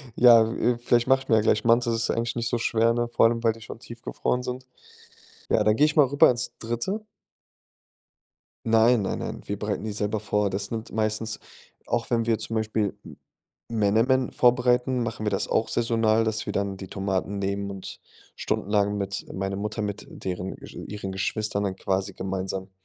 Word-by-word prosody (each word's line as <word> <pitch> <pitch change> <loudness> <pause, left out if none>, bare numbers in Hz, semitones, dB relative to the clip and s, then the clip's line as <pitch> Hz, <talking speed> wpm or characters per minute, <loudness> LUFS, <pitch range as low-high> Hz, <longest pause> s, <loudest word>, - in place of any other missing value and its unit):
ja, 115 -2 +7
äh, 120 -1 +1
vielleicht 120 0 +2
mache 135 0 +4
ich - - -26
mir 110 - +5
ja - - +4
gleich 110 0 +2
Mantis, 120 0 +4
das 115 0 -1
ist - - 0
eigentlich 115 +1 -1
nicht 115 -1 -1
so 120 - 0
schwer, 115 0 +2
ne, 120 0 0
vor 120 - +4
allem, 115 0 -2
weil 115 - +4
die 115 - -15
schon 110 - -9
tiefgefroren 120 +1 -3
sind. 125 +1 -5 0.9
Ja, - - +4
dann 105 0 +3
gehe 150 - +5
ich 150 - -2
mal 145 -3 +7
rüber 140 +2 +5
ins 125 0 -3
3. 120 - -3 1.6
Nein, 115 0 +4
nein, 95 - -2
nein, - - -5
wir 100 0 -4
bereiten 105 -1 -2
die 110 - -3
selber 105 0 -2
vor. 105 -1 0
Das 100 +1 -4
nimmt 115 -1 -5
meistens 110 0 -2 0.5
auch 120 -1 -1
wenn 115 -2 +1
wir 115 -1 +2
zum 115 - -4
Beispiel 110 -2 0
M - - -12 0.6
Menemen 115 +5 +2
vorbereiten, 125 0 +3
machen 115 -2 -4
wir - - +2
das - - -1
auch 110 - +1
saisonal, 115 -1 +2
dass 110 0 -2
wir - - -4
dann 100 -1 -1
die 95 -1 -8
Tomaten 95 +1 -2
nehmen 100 0 -2
und 95 -1 -8 0.4
stundenlang 105 0 0
mit 100 -1 -3
meine 95 0 -3
Mutter 105 +1 -3
mit 105 0 -4
deren 95 0 -5 0.3
ihren 100 -2 -5
Geschwistern 100 +2 -2
dann 95 - -2
quasi 95 +1 -2
gemeinsam, 95 0 -4
110 Hz, 190 wpm, -25 LUFS, 100-120 Hz, 1.6 s, ja